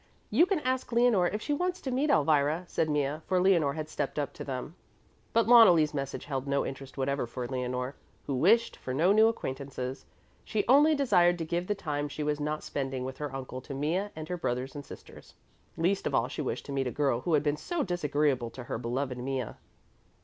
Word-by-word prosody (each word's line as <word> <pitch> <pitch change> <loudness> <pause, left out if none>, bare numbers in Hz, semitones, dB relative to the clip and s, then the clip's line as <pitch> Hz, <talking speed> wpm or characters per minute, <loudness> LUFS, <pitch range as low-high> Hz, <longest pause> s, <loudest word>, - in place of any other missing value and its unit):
"You 345 - +5
can 370 -6 0
ask 255 -2 -1
Leonore 235 -6 +4
if 210 +4 -3
she 295 - -1
wants 360 +4 -1
to 265 - -3
meet 275 +4 +1
Elvira," 150 - +3
said 160 -2 -1
Mea, 145 0 0
for 185 -1 +2
Leonore 170 -7 +3
had 155 -1 -4
stepped 150 -2 -4
up 145 -2 -2
to - - -7
them. 135 +3 -5 0.6
But 230 - +3
Loneli's 180 -11 +7
message 140 -2 -4
held 135 -1 -3
no 140 0 +1
interest 135 0 -8
whatever 135 -1 -1
for 120 +1 -5
Leonore, 125 0 -3 0.3
who 140 - -2
wished 215 - +3
for 130 - -5
no 170 +7 +4
new 220 +2 +6
acquaintances. 135 - -4 0.4
She 210 -2 -1
only 295 +5 +6
desired 175 -11 +3
to 165 - -3
give 175 +2 -2
the 205 - 0
time 145 -5 -3
she 150 - -4
was 150 0 -1
not 150 +1 -2
spending 135 -2 -3
with 130 0 -7
her 150 -2 -4
uncle 130 -1 -6
to 140 - -7
Mea 165 +8 0
and 155 0 -6
her 180 - -3
brothers 130 -4 -2
and 145 - -7
sisters. - - -13 0.4
Least 185 +4 +1
of - - -1
all 115 - +2
she 145 - -5
wished 125 -4 -3
to - - -7
meet 135 -1 -1
a - - -2
girl 135 -4 0
who 170 - -1
had 145 - +2
been 145 -1 +1
so 340 - -2
disagreeable 150 - 0
to 125 +2 -9
her 115 - -4
beloved 125 +2 -3
Mea. 130 -1 -2
150 Hz, 215 wpm, -29 LUFS, 135-185 Hz, 0.6 s, Loneli's